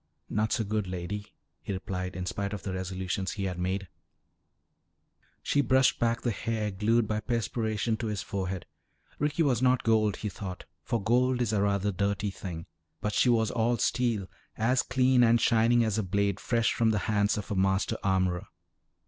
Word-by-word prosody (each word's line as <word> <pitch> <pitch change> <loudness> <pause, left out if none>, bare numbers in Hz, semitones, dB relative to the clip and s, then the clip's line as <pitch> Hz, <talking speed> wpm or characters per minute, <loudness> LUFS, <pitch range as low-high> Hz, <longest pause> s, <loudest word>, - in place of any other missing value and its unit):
"Not 110 +1 0
so 115 - +1
good, 105 -1 -1
Lady," 95 +3 -5 0.3
he - - -5
replied 95 -1 -4
in 90 0 -3
spite 100 +2 -3
of 105 - -5
the 95 - -3
resolutions 95 +1 -3
he 100 - -4
had 90 -2 -3
made. 95 +2 -2 1.6
She 145 - +2
brushed 130 0 +3
back 115 0 +1
the 120 - 0
hair 110 +1 -2
glued 110 +3 +2
by 105 0 -1
perspiration 110 -1 -1
to 115 - -3
his 105 -2 -3
forehead. 95 -2 -3 0.5
Ricky 150 +3 +1
was 130 -6 +2
not 130 -1 +3
gold, 110 -3 +3
he 105 - -4
thought, 95 -1 -7 0.2
for 115 - -1
gold 125 +4 +2
is 115 -3 0
a 100 - +2
rather 100 0 +1
dirty 100 +1 -1
thing. 85 -4 -7 0.3
But 105 - -2
she 125 - +3
was 110 -2 +3
all 120 0 +1
steel, 115 -4 0 0.3
as 125 +3 +2
clean 130 -1 +3
and 115 0 +5
shining 115 +1 +4
as 110 -1 0
a - - 0
blade 100 +1 0
fresh 115 -1 +1
from 115 -1 +2
the 110 - +2
hands 105 -1 +2
of 105 - -5
a - - 0
master 95 +1 +1
armorer. 95 -2 +1
105 Hz, 180 wpm, -29 LUFS, 95-115 Hz, 1.6 s, and